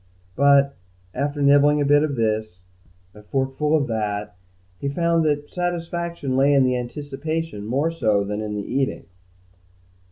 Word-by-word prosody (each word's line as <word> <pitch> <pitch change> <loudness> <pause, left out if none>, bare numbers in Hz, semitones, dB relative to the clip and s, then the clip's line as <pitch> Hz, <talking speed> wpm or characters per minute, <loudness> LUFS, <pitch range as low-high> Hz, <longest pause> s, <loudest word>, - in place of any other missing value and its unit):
But, 140 0 +4 0.4
after 145 +1 -2
nibbling 145 +1 +5
a 145 - +1
bit 145 +1 +5
of 150 -2 -1
this, 110 -5 -1 0.6
a 105 - -14
forkful 135 +6 -1
of 145 - 0
that, 105 -4 -3 0.4
he 140 - -2
found 170 +2 +1
that 145 -1 0
satisfaction 170 -5 -3
lay 140 +2 +4
in 135 - +5
the 130 -1 +2
anticipation 145 -1 -4
more 140 +8 0
so 105 -11 +1
than 105 +1 -4
in 105 -1 -4
the 100 -1 -4
eating. 135 +1 -2
140 Hz, 150 wpm, -22 LUFS, 115-150 Hz, 0.6 s, nibbling